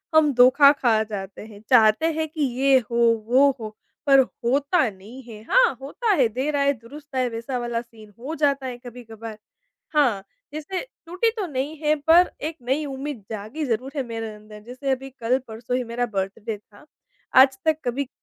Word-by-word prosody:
हम 305 -2 +5
धोखा 260 +3 +7
खा 235 -6 +2
जाते 200 -3 -7
हैं। 210 -2 -13
चाहते 225 +3 +5
हैं 315 0 -2
कि 310 0 -6 0.2
ये 270 -1 +5
हो, 235 - -1 0.3
वो 265 +4 +5
हो, 215 -1 -7 0.3
पर 275 -1 +7
होता 265 +2 +1
नहीं 210 +7 -12
है, 220 -3 -11
हाँ, - - +4
होता 430 - -2
है, 245 - +5
देर 270 +6 -2
आए 280 0 +2
दुरुस्त 280 +4 -13
आए, 255 -1 +1
वैसा 230 +3 -4
वाला 240 -1 -2
सीन 220 -3 -17
हो 285 +7 -5
जाता 280 -3 +1
है 250 -2 -5
कभी-कभार। 225 -2 -9 0.6
हाँ, 235 -10 +2 0.3
जैसे 310 +5 -4 0.2
टूटी 365 +7 0
तो 395 - -1
नहीं 290 +1 -4
है 305 0 +3
पर 345 +2 +6 0.2
एक 325 0 -7
नई 270 +5 -1
उम्मीद 275 -4 -6
जागी 220 +9 -5
ज़रूर 250 +2 -2
है 275 - -1
मेरे 225 -1 -5
अंदर, 210 0 -13
जैसे 255 +4 -4
अभी 265 +1 -3
कल-परसों 240 0 -2
ही 255 - -2
मेरा 240 +1 -2
बर्थडे 200 +3 -3
था। 210 +6 -21 0.5
आज 265 0 +7
तक 315 -1 +3
कभी 255 +3 -2
255 Hz, 180 wpm, -23 LUFS, 225-285 Hz, 0.6 s, धोखा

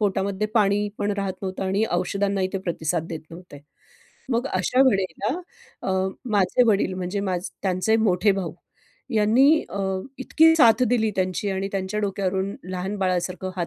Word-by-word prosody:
पोटामध्ये 200 0 0
पाणी 205 -1 +2
पण 205 - 0
राहत 195 -2 -2
नव्हतं 190 0 -3
आणि 195 +3 +1
औषधांनाही 195 +1 0
ते 195 - -1
प्रतिसाद 170 -2 -2
देत 160 -2 -5
नव्हते. 170 -3 -11 0.7
मग 240 +2 0
अशा 185 +4 0
वेळेला 195 - -1 0.5
अ, - - -2 0.4
माझे 205 +3 +3
वडील 200 -3 +2
म्हणजे 185 +2 -3
माझ 185 -3 -1 0.2
त्यांचे 190 +3 +1
मोठे 205 -2 +3
भाऊ 185 -5 -3 0.6
यांनी 220 +5 +4 0.2
अ, - - -6
यांनी 190 -1 -1
अ, - - -10
इतकी 320 +5 +4
साथ 235 -5 +5
दिली 220 -2 +2
त्यांची 185 +2 -1
आणि 195 0 -2
त्यांच्या 195 +2 -2
डोक्यावरून 195 -1 -1 0.2
लहान 185 +2 -3
बाळासारखं 185 0 -1
हात 175 -2 -1
195 Hz, 160 wpm, -24 LUFS, 185-210 Hz, 0.7 s, साथ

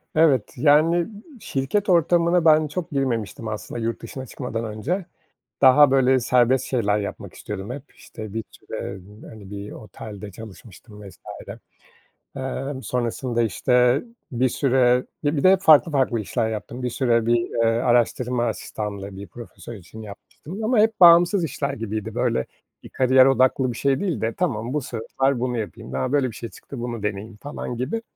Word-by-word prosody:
Evet, 150 -8 +3
yani, 155 +6 +4 0.3
şirket 175 +7 -2
ortamına 170 0 +3
ben 155 0 +5
çok 170 +3 -5
girmemiştim 115 -5 -2
aslında 110 +2 -5
yurt 115 +1 -3
dışına 130 -1 -7
çıkmadan 115 -2 -5
önce. 130 - -3 0.6
Daha, 135 +1 +7
böyle, 130 -1 +4
serbest 125 +1 +2
şeyler 105 -5 0
yapmak 100 - -6
istiyordum 105 +2 -7
hep. 135 +1 -7
İşte, 110 -2 -10
bir 115 - -3
süre 100 0 -7 0.3
hani, 105 -3 -12
bir 100 0 -7
otelde 105 -1 -9
çalışmıştım 105 +1 -13
vs. - - -17 1.2
Emm, 135 +1 -4
sonrasında, 120 0 -1
işte, 125 +5 +2 0.3
bir 125 +2 +2
süre 125 -1 +2 0.2
ya, 145 +1 0
bir 140 - 0
de 185 - +7
hep 190 - +3
farklı, 160 -2 +6
farklı 130 -5 +1
işler 110 +2 -1
yaptım. 110 +4 -6
Bir 125 - -1
süre 115 -2 +1
bir, 120 0 +4
eee, - - -4
araştırma 120 +1 +1
asistanlığı 100 -3 -5
bir 100 +1 -8
profesör 120 +1 -11
için 105 +3 -11
yapmıştım 150 - -9
ama 235 +1 +2
hep 220 0 +2
bağımsız 175 +2 +7
işler 155 - -3
gibiydi. 110 -2 -5
Böyle 65 - 0 0.4
bir - - -11
kariyer 130 0 +4
odaklı 130 -1 +2
bir - - -8
şey 135 +2 +1
değil 175 - -2
de 115 +1 -1
"Tamam, 125 -9 -2
bu 150 - +1
sefer 130 +3 -1
bunu 125 -1 -1
yapayım, 100 - -7
a, 125 - -1
böyle 140 -3 +2
bir - - -13
şey 115 - -6
çıktı, 135 - -10
bunu 120 -2 -5
deneyeyim." 105 +1 -4
falan 125 0 -6
gibi. 140 - -3
125 Hz, 165 wpm, -23 LUFS, 110-145 Hz, 1.2 s, Daha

